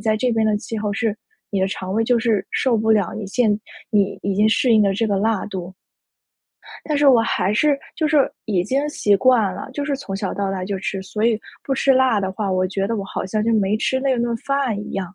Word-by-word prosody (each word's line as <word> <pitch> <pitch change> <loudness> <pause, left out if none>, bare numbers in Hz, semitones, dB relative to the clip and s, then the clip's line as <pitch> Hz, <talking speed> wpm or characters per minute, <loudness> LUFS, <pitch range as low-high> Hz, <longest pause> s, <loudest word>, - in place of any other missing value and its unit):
在 215 -1 +1
这 245 +1 0
边 220 -1 +1
的 210 -1 +2
气 220 +1 -5
候 210 -1 -2
是 220 -2 0 0.4
你 195 -2 -1
的 190 - +1
肠 190 0 -5
胃 225 +2 +1
就 240 +1 +2
是 225 -4 0
受 255 -3 +1
不 220 0 +1
了 205 -5 +2
你 215 - -5
现 215 +2 +2 0.4
你 205 -2 +1
已 200 0 -1
经 210 +2 +3
适 240 +2 +3
应 220 - +5
的 195 -1 +2
这 225 +3 0
个 200 -2 0
辣 220 0 0
度。” 185 -2 -6 1.1
但 300 -2 0
是 290 - +3
我 250 -4 +7
还 205 -3 0
是 285 +4 +2 0.2
就 310 - 0
是 295 -3 +3
已 190 -5 0
经 270 +8 0
习 205 -8 +2
惯 225 -4 +3
了， 260 - -7
就 285 +2 -3
是 280 -1 -1
从 195 -8 -6
小 195 -1 -3
到 200 -1 -2
大 190 -1 -3
就 195 0 -3
吃。 195 0 -3
所 210 +3 -3
以 225 -2 +2 0.2
不 270 - -1
吃 270 0 +3
辣 255 -5 +3
的 190 -1 -2
话， 200 0 -3
我 185 0 +1
觉 195 +1 -2
得 230 +2 -2
我 200 - -3
好 195 - -4
像 215 +3 -1
就 230 - +1
没 205 -1 +2
吃 260 +4 0
那 265 -2 +1
顿 235 0 0
饭 275 -5 -1
一 - - -8
样。 190 -1 -4
215 Hz, 275 characters per minute, -21 LUFS, 195-245 Hz, 1.1 s, 我